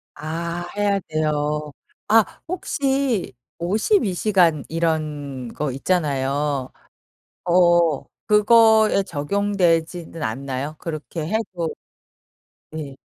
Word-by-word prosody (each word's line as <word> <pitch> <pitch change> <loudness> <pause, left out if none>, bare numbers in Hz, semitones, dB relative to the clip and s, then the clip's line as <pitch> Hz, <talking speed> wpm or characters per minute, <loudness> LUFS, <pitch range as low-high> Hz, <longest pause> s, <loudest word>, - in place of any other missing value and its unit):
아. 170 +3 -4
해야 205 -1 +2
돼요. 150 -1 -1 0.4
아 220 +1 +6 0.2
혹시 275 - -1 0.2
52 205 - +1
시간 175 -6 +2
이런 150 -6 -2
거 150 -2 -2
있잖아요. 140 -3 -1 0.7
어 175 -4 +4 0.2
그거에 220 -1 +5
적용되지는 170 -1 -1
않나요? 135 +5 -3
그렇게 155 0 -5
해도 180 -4 -2 1.0
네. 150 -4 -7
165 Hz, 160 characters per minute, -22 LUFS, 150-200 Hz, 1.0 s, 아